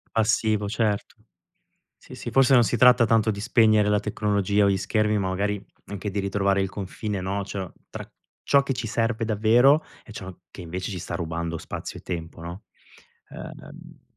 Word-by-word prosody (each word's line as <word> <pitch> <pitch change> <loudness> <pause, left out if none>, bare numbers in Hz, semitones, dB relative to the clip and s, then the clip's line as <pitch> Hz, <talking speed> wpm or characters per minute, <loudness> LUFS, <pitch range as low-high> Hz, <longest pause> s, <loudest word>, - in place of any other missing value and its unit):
Passivo, 110 -1 +1
certo. 105 -1 -1 0.8
Sì, - - -14
sì, - - -6
forse 135 0 +4
non 120 -2 +6
si 120 - 0
tratta 125 +1 +6
tanto 115 -1 +3
di 100 -1 -4
spegnere 110 -1 +3
la 105 0 +2
tecnologia 105 -1 +1
o - - +4
gli 95 - +2
schermi, 105 +2 0
ma 95 -2 -1
magari 100 +2 -2 0.2
anche 100 0 -5
di 100 - -4
ritrovare 100 0 +1
il 95 - 0
confine, 100 +1 -5
no, 95 +2 -2
c'ho 95 -2 -6 0.2
tra - - -8 0.3
ciò 140 - +4
che 140 - -1
ci 125 -3 -4
serve 115 +1 -1
davvero 115 +8 +4 0.2
e - - -15
ciò 95 -3 -8 0.2
che, - - -11
invece, 90 +3 -5
ci 95 - -4
sta 85 - -6
rubando 85 0 -3
spazio - - -7
e - - -29
tempo, 85 -1 -6
no? 85 +4 -8 0.7
Ehm - - -11
105 Hz, 180 wpm, -25 LUFS, 95-110 Hz, 0.8 s, non